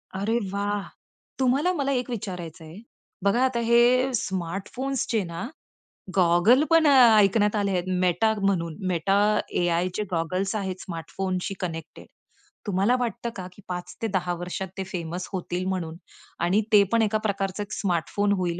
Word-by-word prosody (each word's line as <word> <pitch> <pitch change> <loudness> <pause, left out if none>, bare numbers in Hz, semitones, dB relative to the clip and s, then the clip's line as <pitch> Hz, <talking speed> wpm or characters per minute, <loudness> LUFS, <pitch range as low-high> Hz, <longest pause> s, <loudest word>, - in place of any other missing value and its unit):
अरे 215 +4 0
वाह! 205 0 -1 0.6
तुम्हाला 270 +7 +2
मला 280 -4 -1
एक 250 -1 -1
विचारायच 180 -7 -6
आहे. 160 +1 -11 0.5
बघा 235 +6 +3
आता 250 -2 0
हे 240 +3 +4
स्मार्टफोन्सचे 205 +6 -2
ना 170 +6 -5 0.7
गॉगल 185 - +5
पण 330 -1 +5
अ, 285 - +6 0.3
ऐकण्यात 210 +1 +3
आले 200 -1 0
आहेत 180 -1 0 0.2
Meta 185 +5 +2
म्हणून 170 -5 0 0.2
Meta 195 +4 +1 0.4
AIचे 175 +3 0
गॉगल्स 185 +4 -1
आहेत 190 -3 -3
स्मार्टफोनशी 185 +2 -4
कनेक्टेड. 165 -3 -6 0.6
तुम्हाला 200 +6 +2
वाटतं 235 0 -2
का 185 -2 -6
की 205 - -16
5 180 0 -6
ते 225 - 0
10 180 -1 0
वर्षात 180 +2 -4
ते 190 - -2
फेमस 180 -1 -5
होतील 180 0 -3
म्हणून 170 -4 -3 0.5
आणि 185 +5 +3
ते 205 - +8
पण 230 -1 +3
एका 215 0 +2
प्रकारचं 200 -1 -1
एक 205 - -13
स्मार्टफोन 200 +2 0
होईल 175 -1 -2
195 Hz, 150 wpm, -25 LUFS, 180-225 Hz, 0.7 s, ते